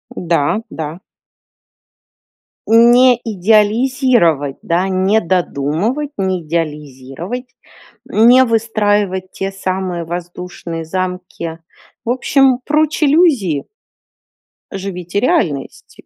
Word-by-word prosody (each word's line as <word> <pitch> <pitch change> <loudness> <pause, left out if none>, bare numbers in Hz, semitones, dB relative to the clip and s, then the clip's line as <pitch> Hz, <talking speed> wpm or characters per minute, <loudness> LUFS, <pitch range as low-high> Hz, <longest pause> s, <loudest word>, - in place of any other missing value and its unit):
Да, 170 +2 0
да. 160 -1 -6 1.7
Не 240 +3 +6
идеализировать, 215 - +2
да, 175 +3 0
не 190 +3 +2
додумывать, 180 - -1
не 185 -2 -1
идеализировать, 150 - -5 0.6
не 240 +4 +5
выстраивать 205 -5 0
те 195 0 -4
самые 185 -2 -3
воздушные 175 -1 -6
замки. 180 -2 -5 0.5
В - - -3
общем, 260 +1 +2
прочь 305 +1 +1
иллюзии! 275 - +2 1.1
Живите 185 -1 -4
реальностью. 205 - -2
190 Hz, 80 wpm, -16 LUFS, 170-235 Hz, 1.7 s, Не